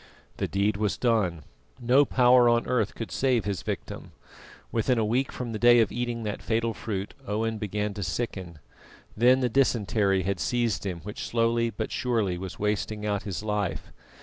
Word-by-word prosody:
The - - -1
deed 100 +1 0
was 105 -1 -1
done; 100 - +1 0.4
no 130 +4 +4
power 125 -2 +5
on 120 0 +2
earth 115 -5 0
could 115 - -6
save 130 -5 +1
his 100 -3 -2
victim. - - -6 0.6
Within 120 +2 +1
a 110 - +2
week 125 +5 0
from 125 -2 -5
the 110 - -4
day 120 +1 +6
of 115 - +2
eating 120 -1 -3
that 105 -1 -4
fatal 115 0 0
fruit 100 -3 -4
Owen 110 +1 -1
began 105 0 -2
to 100 - -6
sicken, 90 -2 -4 0.6
then 125 +4 +4
the 125 - +2
dysentery 105 -6 +2
had 95 0 -2
seized 120 -3 0
him 90 -3 -4
which 105 +4 -6
slowly 115 0 +1
but 110 -1 -5
surely 110 -8 0
was 95 -1 -7
wasting 105 0 -2
out 100 -2 0
his 95 +2 -4
life. 105 -3 -2
110 Hz, 175 wpm, -27 LUFS, 100-120 Hz, 0.6 s, day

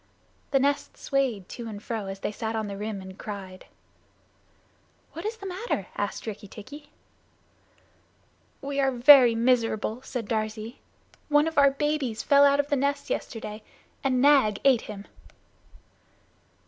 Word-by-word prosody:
The 275 - +3
nest 280 +2 0
swayed 260 -9 -1
to 235 -2 -7
and 215 -2 -6
fro, 215 -1 -5
as 195 0 -7
they - - -2
sat 220 +1 -4
on 220 -1 -1
the 200 -1 -6
rim 205 -1 -5
and 190 0 -11
cried. 190 -3 -8 1.5
"What 335 +6 -5
is 450 +1 -4
the 395 - -10
matter?" 370 - -3
asked 205 - -3
Rikki 210 -1 -7
tikki. 285 +9 -11 1.7
"We 280 0 -3
are 270 -1 +3
very 250 -1 +7
miserable," 230 -1 +1
said 245 -4 -5
Darzee. 220 +1 -3 0.5
"One 295 +1 +4
of 325 - -4
our 280 0 +7
babies 275 -5 -2
fell 280 0 +6
out 280 0 +4
of 285 0 0
the 285 - +2
nest 280 +1 -1
yesterday 215 -1 -5 0.4
and 260 -2 +1
Nag 265 -7 +4
ate 260 -4 +5
him." 205 -1 -9
240 Hz, 150 wpm, -26 LUFS, 215-280 Hz, 1.7 s, very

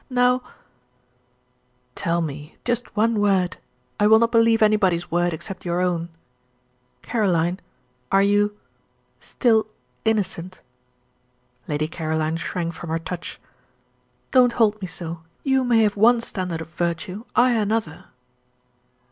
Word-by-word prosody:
Now 250 0 +3 0.8
" - - -42 0.7
"Tell 170 +1 0
me 150 0 -6
just 240 -2 -2
one 225 0 +2
word 195 -3 +1 0.4
I 210 - +4
will 220 +1 +7
not 230 +1 +2
believe 230 -1 +4
anybody's 190 -5 +2
word 175 +1 +1
except 185 +4 -7
your 175 0 -1
own. 175 -2 -1 0.9
Caroline, 180 -5 0 0.5
are 195 0 +5
you 205 +1 +2 0.6
still 220 -3 +1 0.4
innocent?" 185 -4 -1 1.1
Lady 150 +1 -1
Caroline 160 -1 -2
shrank 170 0 -3
from 170 - -8
her 165 - 0
touch. 170 +1 -7 0.9
"Don't 250 -2 +5
hold 215 -2 +2
me 185 - -3
so. 170 -2 -7 0.2
You 265 -1 +2
may 235 -3 +4
have 210 -1 +1
one 230 +4 +5
standard 180 -7 -4
of 160 - -8
virtue, 170 +5 -3
I 250 +1 +5
another." 215 -6 -1
195 Hz, 125 wpm, -23 LUFS, 170-225 Hz, 1.1 s, will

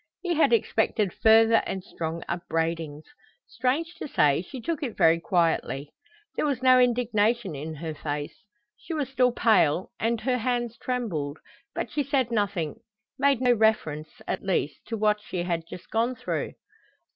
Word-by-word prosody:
He 355 -1 0
had 320 - +3
expected 215 - +1
further 225 +1 +5
and 190 -1 -4
strong 165 -1 -5
upbraidings. 165 -3 -2 0.4
Strange 305 +7 -1
to - - -4
say, 150 - +3
she 255 +8 -9
took 320 +6 -3
it 250 -7 -4
very 165 +1 +5
quietly. 165 -5 0 0.4
There - - 0
was 265 -3 -2
no 255 0 +7
indignation 235 -4 +2
in 155 +3 -6
her 160 +1 -5
face. 145 -1 -4 0.4
She 330 - -6
was 290 -4 -2
still 255 -2 +3
pale, 190 -8 +3
and 230 +1 0
her 250 +1 0
hands 240 -1 -1
trembled, 180 - -3 0.4
but - - -3
she 295 - 0
said 270 -4 0
nothing, 200 -8 -1 0.4
made 280 -3 +3
no 250 -1 +5
reference, 185 -9 +1 0.2
at - - -2
least, 180 -6 -1
to 225 - -3
what 210 0 +2
she 180 -4 -4
had 170 -2 -2
just 175 - -11
gone 235 +3 +1
through. - - -3
220 Hz, 160 wpm, -26 LUFS, 165-250 Hz, 0.4 s, no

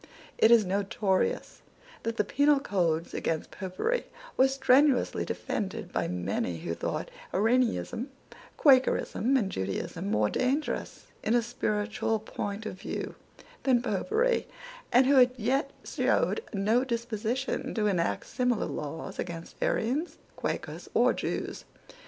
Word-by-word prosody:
It 220 - +6
is 230 -3 +6
notorious 195 0 0 0.4
that 230 0 -3
the - - +3
penal 285 +7 +3
laws 170 -4 +1
against 160 -1 -2
Popery 205 - -2 0.3
were 260 - +5
strenuously 265 0 +3
defended 190 -3 -4
by - - 0
many 90 -1 -2
who 85 - -3
thought - - -3 0.2
Arianism, 235 +4 +1 0.5
Quakerism, 265 -2 +4
and 200 -6 0
Judaism 165 - -3
more 105 - +2
dangerous, 270 +4 -1 0.2
in 225 - +1
a 240 - +3
spiritual 220 -1 -1
point 210 0 -5
of 190 -3 -6
view, - - -4 0.5
than 250 -3 +3
Popery, 440 - +1 0.4
and 255 +2 +6
who 260 -2 +6
yet 260 +6 +1
showed - - +1
no 215 +5 +2
disposition 235 +1 -2
to 215 -2 +1
enact 180 -5 0
similar 250 -3 0
laws 150 +2 -5
against 170 -1 -5
Arians, 275 +10 0 0.2
Quakers, - - -4
or - - +5
Jews. - - -3
225 Hz, 120 wpm, -29 LUFS, 190-260 Hz, 0.5 s, It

